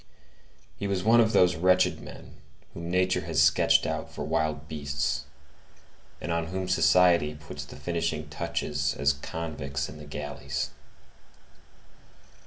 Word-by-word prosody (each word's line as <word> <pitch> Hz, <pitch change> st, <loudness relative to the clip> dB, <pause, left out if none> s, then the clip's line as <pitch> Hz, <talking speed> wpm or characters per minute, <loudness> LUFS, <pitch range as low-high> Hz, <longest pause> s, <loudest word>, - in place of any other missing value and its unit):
He 100 Hz, -, -3 dB
was 95 Hz, -2 st, -1 dB
one 115 Hz, +3 st, +5 dB
of 110 Hz, -1 st, +3 dB
those 90 Hz, -5 st, +5 dB
wretched 90 Hz, +2 st, +3 dB
men -, -, -12 dB, 0.4 s
whom 85 Hz, 0 st, -6 dB
nature 90 Hz, +1 st, +2 dB
has 80 Hz, -3 st, -1 dB
sketched 75 Hz, +1 st, +5 dB
out -, -, -3 dB
for -, -, -5 dB
wild 75 Hz, -1 st, -1 dB
beasts, 70 Hz, -2 st, -2 dB, 0.9 s
and 85 Hz, -, -4 dB
on 85 Hz, 0 st, -1 dB
whom 95 Hz, +2 st, -3 dB
society 90 Hz, -4 st, +4 dB
puts 75 Hz, 0 st, -8 dB
the -, -, -11 dB
finishing 85 Hz, -3 st, -2 dB
touches 75 Hz, -2 st, -2 dB
as 70 Hz, 0 st, +2 dB
convicts 70 Hz, -2 st, -4 dB
in 75 Hz, -, -10 dB
the 75 Hz, -, -10 dB
galleys. 75 Hz, 0 st, -4 dB
80 Hz, 135 wpm, -27 LUFS, 75-90 Hz, 0.9 s, one